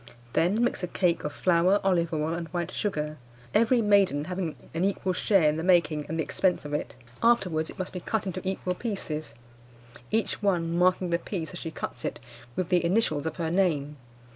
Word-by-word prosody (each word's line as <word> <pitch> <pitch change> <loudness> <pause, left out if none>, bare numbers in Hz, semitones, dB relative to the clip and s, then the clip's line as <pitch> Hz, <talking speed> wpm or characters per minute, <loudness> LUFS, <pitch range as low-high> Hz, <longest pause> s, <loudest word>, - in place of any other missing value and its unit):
Then 200 +8 +2
mix 245 - 0
a 180 - -2
cake 175 -1 +1
of 150 - -2
flour, 180 +5 +3
olive 175 -3 +2
oil, 155 0 -1
and 170 0 -4
white 170 +1 -3
sugar; 155 -7 -2 0.3
every 230 +2 +4
maiden 200 -8 +4
having 180 -2 -3 0.2
an 165 +2 -1
equal 190 -1 0
share 185 -2 +3
in 150 +1 +2
the 160 - -3
making 170 -4 +3
and 160 - -3
the 160 - +1
expense 180 -2 0
of 145 - -5
it. 150 - -3 0.3
Afterwards 180 -9 +2
it - - -10
must 185 - -4
be 180 - -4
cut 215 +4 -2
into 185 -1 -3
equal 190 -1 -2
pieces, 180 - -4 0.7
each 225 0 0
one 170 -5 +1
marking 180 0 +2
the 170 - +2
piece 170 -2 -5
as 175 - -6
she 165 - -4
cuts - - -6
it - - -3 0.4
with 185 -2 -2
the 180 -2 +3
initials 170 -5 +1
of 160 - -3
her 165 -2 -2
name. 155 -6 +1
175 Hz, 200 wpm, -27 LUFS, 160-190 Hz, 0.7 s, every